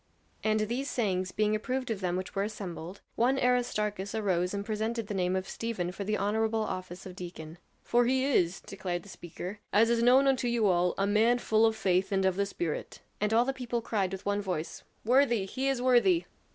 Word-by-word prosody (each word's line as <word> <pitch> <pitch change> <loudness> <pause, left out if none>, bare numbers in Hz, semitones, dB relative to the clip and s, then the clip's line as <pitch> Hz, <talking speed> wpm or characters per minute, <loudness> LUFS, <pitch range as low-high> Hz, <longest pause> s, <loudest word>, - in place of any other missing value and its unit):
And 215 0 +2
these 240 +6 -2
sayings 185 -6 -1
being 215 0 +1
approved 255 +3 -2
of 205 -3 -3
them 180 -1 0
which 185 - -5
were 195 - -1
assembled, 195 -3 -6
one 255 +3 +2
Aristarchus 210 -6 0
arose 185 -4 0
and 200 0 -3
presented 220 +1 -2
the 205 - -5
name 185 -1 0
of 190 0 -2
Stephen 210 -7 -3
for 195 +2 -5
the 210 +2 -1
honorable 220 +2 0
office 185 -3 -6
of 185 -1 -8
deacon. 175 -2 -8 0.2
"For 240 0 +3
he 260 +1 +2
is," 185 -10 +1
declared 180 -3 -4
the - - -14
speaker, 180 +3 -8
"as 225 +3 +4
is 235 -1 +2
known 255 +3 +5
unto 260 -2 +2
you 235 -2 +1
all, 180 -2 +2
a 195 - +1
man 220 +4 +3
full 220 -2 +3
of 220 - 0
faith 185 -2 +1
and 195 -1 +1
of 190 -1 +2
the 200 +1 0
Spirit." 170 -5 -4 0.2
And 210 +1 0
all 230 +2 +4
the 270 - -1
people 245 -2 -3
cried 200 -5 -1
with 190 +1 -6
one 205 0 0
voice: 180 -5 -4 0.2
"Worthy! 240 -4 +3
He 260 +7 -3
is 265 -2 0
worthy!" 260 +8 +4
210 Hz, 210 wpm, -29 LUFS, 185-235 Hz, 0.2 s, known